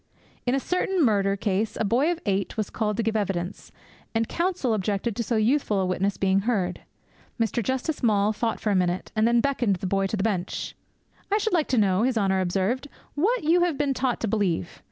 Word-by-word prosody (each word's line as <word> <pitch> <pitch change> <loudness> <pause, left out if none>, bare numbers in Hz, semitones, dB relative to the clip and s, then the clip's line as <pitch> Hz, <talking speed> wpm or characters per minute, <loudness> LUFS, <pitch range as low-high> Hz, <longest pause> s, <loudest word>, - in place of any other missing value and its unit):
In 245 - +3
a - - +1
certain 365 +2 +1
murder 200 -3 +2
case 205 +2 -1
a - - +1
boy 255 - +2
of 345 - -3
eight 200 +1 -1
was 215 -2 -2
called 210 -2 -1
to 230 - +1
give 220 0 -1
evidence, 195 -3 -3 0.4
and 225 0 +1
counsel 340 -9 0
objected 205 +2 -1
to 235 - -1
so 230 - -1
youthful 220 -1 +2
a 190 - +1
witness 185 +2 0
being 190 0 +2
heard. 195 -5 -1 0.6
Mr. 230 +1 +1
Justice 260 - -2
Maule 210 -3 +3
thought 225 +1 -2
for 215 - 0
a - - +2
minute, 180 0 0
and 215 +1 +3
then 235 0 +4
beckoned 245 -7 +1
the 180 - -6
boy 195 +1 +1
to 215 - -2
the 195 - -1
bench. 195 -5 -2 0.6
'"I 415 - +4
should 435 -1 -1
like 325 -4 +2
to 255 - 0
know," 195 -2 +3
His 250 0 +1
Honour 190 -2 +2
observed, 195 +9 -1 0.3
"what 400 +9 +1
you 335 +3 +4
have 345 -5 +1
been 285 -2 +1
taught 255 -1 -1
to 230 - 0
believe. 195 - -1
220 Hz, 215 wpm, -25 LUFS, 195-260 Hz, 0.6 s, then